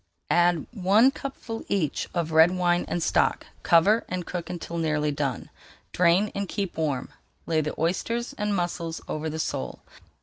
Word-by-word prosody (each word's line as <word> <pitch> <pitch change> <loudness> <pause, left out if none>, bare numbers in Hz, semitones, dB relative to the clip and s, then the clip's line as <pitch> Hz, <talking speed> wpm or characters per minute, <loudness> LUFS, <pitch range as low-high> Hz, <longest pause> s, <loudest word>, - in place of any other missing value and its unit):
Add 175 -2 +3
one 215 +4 +4
cupful 265 -5 -6
each 165 -8 -1
of 165 -2 -1
red 160 +2 +7
wine 175 -1 +1
and 175 - -1
stock, - - +1 0.2
cover, 200 +7 +4
and 180 -1 -3
cook 175 -2 -5
until 170 -1 -5
nearly 150 -2 0
done. 140 -4 -3 0.4
Drain 180 +4 +3
and 200 -2 -3
keep 200 -3 -3
warm, 145 -5 -1 0.4
lay 160 -1 +1
the 150 0 -4
oysters 230 +9 -1
and 210 -1 -1
mussels 170 -2 -2
over 155 +1 -3
the 155 - -5
sole. 160 - -3
175 Hz, 160 wpm, -26 LUFS, 160-195 Hz, 0.4 s, red